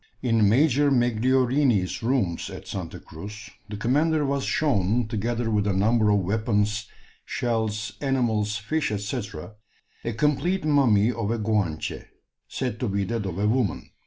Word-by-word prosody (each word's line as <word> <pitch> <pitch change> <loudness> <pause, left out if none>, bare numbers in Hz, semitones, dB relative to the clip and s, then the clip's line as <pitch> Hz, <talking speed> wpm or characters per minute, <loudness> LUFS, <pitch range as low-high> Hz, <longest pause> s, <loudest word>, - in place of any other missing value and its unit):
In 115 -4 +3
Major 145 +4 +4
Megliorini's 120 - +2
rooms 115 -8 0
at - - -9
Santa - - -6
Cruz 105 +7 -10 0.2
the 105 - -5
commander 150 +7 +2
was 140 0 -1
shown, 115 -5 +1
together 115 +2 -2
with 105 -1 +1
a 100 - +1
number 110 +3 +3
of 105 -1 +3
weapons, 105 +1 0 0.4
shells, 110 -3 -2
animals, 115 -6 0
fish, 155 +10 -1
&c., 105 +5 -3 0.8
a 115 - -2
complete 150 - 0
mummy 125 -8 +4
of 115 -3 -3
a 115 - 0
Guanche, 105 -8 -1 0.4
said 125 -4 -3
to 125 - -1
be 100 0 0
that 110 -1 -2
of 90 -2 -5
a 105 +1 +1
woman. 115 -3 0
115 Hz, 145 wpm, -25 LUFS, 105-130 Hz, 0.8 s, Major